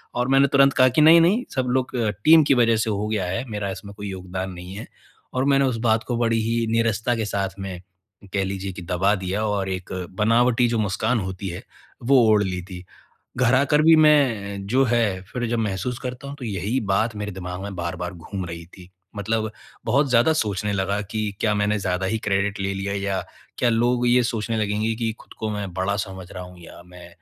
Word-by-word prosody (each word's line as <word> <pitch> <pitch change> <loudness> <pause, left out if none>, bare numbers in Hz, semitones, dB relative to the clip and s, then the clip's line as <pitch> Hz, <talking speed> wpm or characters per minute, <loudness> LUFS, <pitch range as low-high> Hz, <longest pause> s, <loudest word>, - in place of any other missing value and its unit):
और 125 +1 0
मैंने 135 +1 +5
तुरंत 140 0 +4
कहा 130 0 +5
कि - - +6
नहीं-नहीं 170 +9 +6
सब 130 -1 0
लोग 130 0 -3
अ, 110 -3 +1 0.2
टीम 160 0 +8
की 140 - +3
वज़ह 115 -2 +4
से 110 0 0
हो 105 0 -1
गया 105 -4 -1
है। 95 +8 -3
मेरा 105 -2 -3
इसमें 100 +1 -9
कोई 100 -1 -5
योगदान 95 0 -5
नहीं 90 +1 -9
है 105 - -7 0.5
और 130 +1 0
मैंने 140 -1 +3
उस 125 -3 0
बात 110 0 +2
को 120 -2 -2
बड़ी 115 -1 +1
ही 115 +1 0
निरसता 115 +1 +1
के 110 -1 -2
साथ 100 -2 -1
में 95 -2 -6 0.5
कह 100 -1 +1
लीजिए 95 0 -4
कि 90 - -8
दबा 90 +4 +1
दिया 95 +3 -2
और 100 -2 -1
एक 95 -1 -5 0.3
बनावटी 120 +2 +3
जो 115 - 0
मुस्कान 110 +4 0
होती 95 0 -5
है, 85 - -7 0.4
वो 135 +2 +4
ओढ़ 105 -1 +4
ली 90 -2 -3
थी। 90 -1 -9 0.5
घर 125 0 +3
आकर 145 +3 +3
भी 165 0 +7
मैं 115 -11 +3
जो 130 +5 +3
है 110 -5 +1
फिर 125 -1 -2
जब 120 -1 0
महसूस 110 +4 -2
करता 125 +1 -6
हूँ, 140 - -6
तो 125 - -7
यही 105 +5 -1
बात 110 +3 +1
मेरे 105 0 -4
दिमाग 90 0 -6
में 100 -1 -6
बार-बार 90 +1 -4
घूम 90 +2 -6
रही 85 0 -7
थी। 90 +1 -15 0.3
मतलब 110 +1 -1 0.4
बहुत 135 +4 +2
ज़्यादा 125 +6 +4
सोचने 105 -6 -1
लगा 100 +1 -1
कि 110 +2 -4 0.2
क्या 105 -1 +2
मैंने 105 +1 +1
ज़्यादा 95 0 -1
ही 110 - 0
क्रेडिट 100 0 0
ले 100 0 -1
लिया 100 +1 -3
या 100 -1 -1 0.4
क्या 120 - +2
लोग 120 +2 +2
ये 125 +1 +5
सोचने 115 -1 -2
लगेंगे 105 +1 0
कि 115 -1 -1
खुद - - -15
को 110 -1 -2
मैं 100 -3 -4
बड़ा 95 +2 -1
समझ 95 -2 -9
रहा 90 - -7
हूँ 90 0 -13
या 85 - -13
मैं 90 -1 -13
105 Hz, 220 wpm, -23 LUFS, 95-120 Hz, 0.5 s, टीम